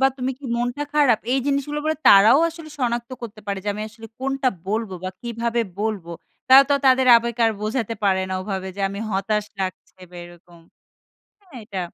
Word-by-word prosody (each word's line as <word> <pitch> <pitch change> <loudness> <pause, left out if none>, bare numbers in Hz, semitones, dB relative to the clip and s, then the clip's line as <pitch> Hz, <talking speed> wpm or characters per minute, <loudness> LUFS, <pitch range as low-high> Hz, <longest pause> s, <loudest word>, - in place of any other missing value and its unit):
বা 270 - +5
তুমি 255 0 -2
কি 290 - -15
মনটা 245 +4 -2
খারাপ? 275 -7 +4
এই 270 - +2
জিনিসগুলা 285 +1 -1
বলা 315 0 0
তারাও 205 +8 +7
আসলে 325 -2 -11
সনাক্ত 235 -1 -2
করতে 220 -2 -8
পারে, 200 -1 -2
যে - - -2
আমি 210 - -5
আসলে 225 +1 -12
কোনটা 270 0 0 0.2
বলব, 220 -1 -1
বা 185 - -2
কিভাবে 235 0 -2 0.2
বলব। 215 -5 -2 0.4
তারা 265 +1 +9
তো - - +5
তাদের 260 0 +4
আবেগ 235 0 -2
আর 225 - +4
বোঝাতে 230 +1 -2
পারে 190 -1 +2
না, 185 - -1
ওভাবে, 190 -1 -4
যে - - -6
আমি 200 +1 -7
হতাশ 205 +2 -1 0.2
লাগছে 185 0 -6
বা 180 - -12
এরকম, 175 0 -16 0.8
হ্যাঁ, 370 -8 -19
এটা। 195 -3 -6
230 Hz, 190 wpm, -22 LUFS, 200-265 Hz, 0.8 s, তারা